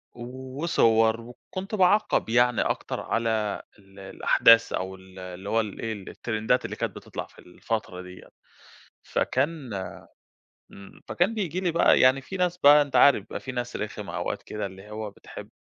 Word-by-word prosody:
وصور 120 -3 +1
وكنت 185 - -7
باعقّب 200 - +3
يعني 120 +1 +3
أكتر - - -2
على 110 -2 -1 0.2
ال 95 0 -18
الأحداث 115 +4 +4
أو 95 +1 -3
ال 95 0 -15
اللي 90 +2 -8
هو 115 - +2
ال 105 -3 -4
إيه 115 -1 -3
الترندات 110 +3 -2
اللي - - -5
كانت - - -3
بتطلع - - -7
في - - -21
الفترة 90 0 -5
دي 90 0 -10
يعني، - - -16 0.7
فكان 140 -2 -1 1.0
امم، 100 0 -14
فكان 180 +6 +1
بييجي 185 -5 -2
لي 180 -2 0
بقى 170 - +4
يعني 130 +1 +5
في 190 +8 -7
ناس 180 -1 0
بقى 150 -2 +7
أنت 145 -2 -3
عارف 130 -8 +6
بقى - - -5
في 130 - -7
ناس 120 -1 -4
رخمه 105 0 -5
أوقات - - -3
كده 105 - -5
اللي 95 +1 -10
هو 105 -1 -5
بتحب - - -11
115 Hz, 165 wpm, -26 LUFS, 105-140 Hz, 1.0 s, بقى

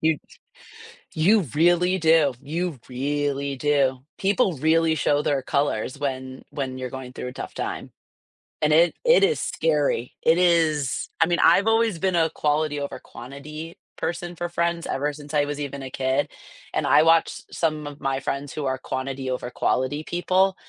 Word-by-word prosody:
You, 160 -1 +2 1.0
you 200 +7 +4
really 175 +3 +3
do. 160 -5 +4
You 165 +2 -3
really 140 +1 -2
do. 135 -2 +1 0.2
People 195 -1 +2
really 160 +3 +3
show 145 0 +2
their 140 -2 +1
colors 130 -2 -1
when, 130 -2 -4
when 130 -2 -4
you're 130 -1 -4
going 130 -1 -7
through 125 - -5
a - - -10
tough - - -7
time. - - -5 0.7
And 150 - +3
it 165 +2 +5
it 485 -3 +5
is 450 +3 +3
scary. 150 -6 0
It 165 - +4
is 160 -6 +2
I - - +6
mean, 175 -1 +1
I've 200 - +6
always 225 -4 +3
been 190 -1 +1
a 165 -1 +3
quality 150 -1 0
over 140 0 -5
quantity 150 +6 -9 0.2
person 175 +1 -3
for 175 +1 -4
friends 170 0 -1
ever 145 +2 -1
since 145 0 -11
I 145 -1 +3
was 145 0 -4
even 140 -1 -5
a 130 - -6
kid, 130 +2 0 0.4
and - - 0
I 150 - +6
watched 165 0 +3
some 155 -3 -1
of 145 0 -9
my 135 -1 -1
friends 140 0 -4
who 150 - -4
are 130 0 0
quantity 130 0 -4
over 125 -1 -3
quality 145 +4 0
people, 185 +3 +1
150 Hz, 170 wpm, -24 LUFS, 135-170 Hz, 1.0 s, I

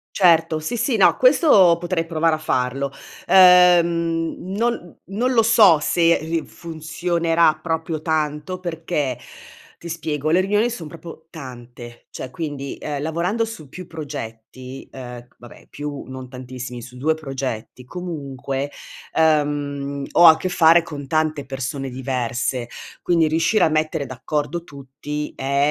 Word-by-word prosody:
Certo, 165 -4 +4
sì, 155 +10 -4
sì, 235 -1 0
no, 190 - +5
questo 255 - +5
potrei 175 -1 -1
provare 165 -1 +1
a - - -3
farlo. 135 -2 -1 0.3
Ehm, 170 -3 +5
non 200 -1 -2
non 230 +7 -1
lo 230 -2 +4
so 215 -8 +6
se 170 +2 +3
ri 160 0 -3
funzionerà 165 0 0
proprio 160 -1 -3
tanto 155 +2 -2
perché, 160 -7 -3 0.6
ti 170 - -9
spiego, 155 -3 -3
le 175 - +4
riunioni 205 +5 +1
son 180 -10 -6
proprio 165 0 -11
tante, 120 -5 -11
cioè 130 - -7
quindi, 145 -3 -5
ehm, 145 -2 -4
lavorando 175 +9 -1
su 210 -11 -10
più 185 +3 -9
progetti 130 -4 -8
ehm, 125 -2 -9
vabbè, 120 -1 -15
più 145 -1 -6
non 130 -1 -8
tantissimi, 125 -1 -8
su 125 +1 -11
2 155 +4 +1
progetti 135 -5 -6
comunque, 140 -5 -5 0.4
ehm, 145 -3 0
ho 175 - +7
a 160 -1 +9
che 185 - -3
fare 170 -1 +5
con 145 -4 -8
tante 155 -1 -1
persone 135 +1 -4
diverse, 125 -1 -2 0.3
quindi 165 -3 +2
riuscire 165 +7 +2
a - - +4
mettere 155 -1 0
d'accordo 145 +6 -3
tutti 145 +1 -7
è 140 +2 +1
155 Hz, 140 wpm, -21 LUFS, 135-170 Hz, 0.6 s, a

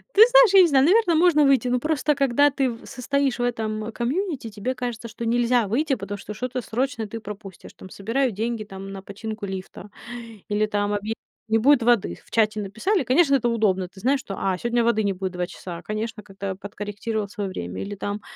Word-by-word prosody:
Ты 415 - +7
знаешь, - - +6
я 390 - +9
не 355 - +6
знаю, 275 -2 +4
наверно, 370 -1 +4
можно 315 -3 +5
выйти. 265 -3 +3
Но 250 0 +1
просто 300 +1 +1
когда 275 +1 +4
ты 270 -2 0
в 230 - -10
состоишь 275 +1 -1
в - - 0
этом, 220 -2 -2
комьюнити, 270 - -2
тебе 215 +4 -3
кажется, 240 -2 -4
что 230 +1 -6
нельзя 240 -1 +2
выйти, 275 +7 +1
потому 205 -2 -6
что 205 +2 -8
что-то 250 +3 -3
срочное 245 +1 -2
ты 225 +2 -6
пропустишь. 205 -3 -10
Там 190 - -12
собирают 230 +6 -1
деньги, 225 +2 -2
там, 195 -1 -9
на 195 -1 -7
починку 215 +1 -6
лифта 190 +1 -7 0.6
или 210 +1 +2
там 205 -1 -1
объя 205 +2 -2
там - - -22 0.3
не 225 - +5
будет 265 +3 +5
воды. 225 - +2
В - - -22
чате 215 -1 +2
написали, 220 - 0
конечно, 275 +4 +3
это 240 -3 +3
удобно. 195 -5 +1
Ты 190 - -15
знаешь, 270 +4 +2
что: 200 -6 -6
"А, 190 -1 0
сегодня 235 0 +1
воды 230 -2 +2
не 200 -1 +1
будет 185 0 -4
2 180 -1 -3
часа". 175 -1 -8
А, - - -12
конечно, 215 +2 -4
как-то 195 -1 -6
подкорректировал 205 +2 -4
своё 200 -1 -4
время 90 - -5
или 205 0 -5
там: 205 +1 -4
225 Hz, 215 wpm, -24 LUFS, 205-265 Hz, 0.6 s, я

